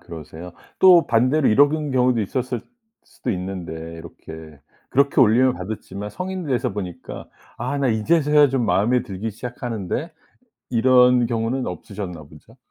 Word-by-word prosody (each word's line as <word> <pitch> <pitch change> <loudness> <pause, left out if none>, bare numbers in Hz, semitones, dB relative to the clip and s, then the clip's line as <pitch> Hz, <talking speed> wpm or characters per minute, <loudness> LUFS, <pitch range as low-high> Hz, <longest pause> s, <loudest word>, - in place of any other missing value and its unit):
그러세요. 85 +1 -10 0.3
또 180 -3 +7
반대로 130 +5 +2
이런 145 +7 +5
경 155 -1 -3
경우도 125 -2 +2
있었을 125 +3 -3 0.4
수도 - - -6
있는데 90 -2 -5 0.2
이렇게 80 -2 -11 0.3
그렇게 140 +1 +3
놀림을 125 +2 +5
받았지만 100 +2 -7
성인 185 - -5
돼서 130 -7 -1
보니까 95 -4 -7 0.3
'아 130 +4 -3
나 135 -2 +1
이제서야 150 +6 +3
좀 130 -3 -1
마음에 105 +7 +2
들기 105 -1 -5
시작하는데.' 120 - -5 0.6
이런 125 0 +4
경우는 115 +3 -2
없으셨나 95 -6 -7
보죠. 75 0 -18
120 Hz, 330 characters per minute, -22 LUFS, 95-130 Hz, 0.6 s, 또